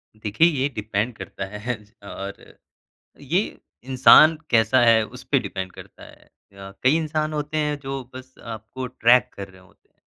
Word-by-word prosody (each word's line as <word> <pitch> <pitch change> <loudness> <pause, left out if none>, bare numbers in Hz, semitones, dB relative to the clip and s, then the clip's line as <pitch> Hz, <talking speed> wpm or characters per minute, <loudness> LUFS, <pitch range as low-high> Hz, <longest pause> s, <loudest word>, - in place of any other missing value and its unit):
देखिए 110 +9 +2
ये 140 -5 0
डिपेंड 105 +2 -2
करता 95 - -7 0.2
है 125 0 -1 0.3
और 100 0 -8 0.8
ये 150 +7 +1 0.4
इंसान 135 +5 +6
कैसा 115 +2 +4
है 115 -1 +5
उसपे - - -2
डिपेंड 95 -1 -6
करता - - -13
है। - - -17 0.3
अ, 100 0 -11
कई 130 +5 +4
इंसान 155 -1 -2
होते 150 0 -4
हैं 150 -1 -1
जो 135 -1 -5
बस 130 0 -11 0.2
आपको 110 +4 -8
ट्रैक 125 0 +3
कर 100 -1 -8
रहे 95 -1 -18
होते। 95 +2 -26
125 Hz, 155 wpm, -23 LUFS, 105-145 Hz, 0.8 s, इंसान